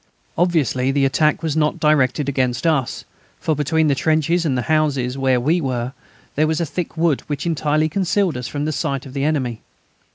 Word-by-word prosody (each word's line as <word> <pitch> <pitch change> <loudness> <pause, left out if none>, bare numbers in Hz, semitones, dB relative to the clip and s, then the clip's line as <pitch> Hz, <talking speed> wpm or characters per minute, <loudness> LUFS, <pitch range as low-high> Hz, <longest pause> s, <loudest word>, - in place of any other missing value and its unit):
Obviously 155 -7 +1
the 135 0 +2
attack 150 +4 +1
was 155 -2 -1
not 155 -1 +1
directed 145 -2 +2
against 130 -1 -1
us, 150 -7 0 0.3
for 155 - 0
between 155 +2 +1
the 145 - +3
trenches 160 +4 +1
and 130 -3 0
the 125 - -1
houses 140 -5 0
where 130 -2 +2
we 160 +8 +1
were 125 -2 -2 0.4
there 155 +2 +2
was 160 0 0
a 170 - 0
thick 170 +1 -5
wood 160 -4 +2
which 145 +1 -3
entirely 155 -1 +1
concealed 190 +1 0
us 125 -1 -4
from 145 0 -3
the 155 - -1
sight 140 -2 -2
of 130 - -10
the 140 -1 -2
enemy. 130 -7 -1
150 Hz, 195 wpm, -20 LUFS, 135-160 Hz, 0.4 s, the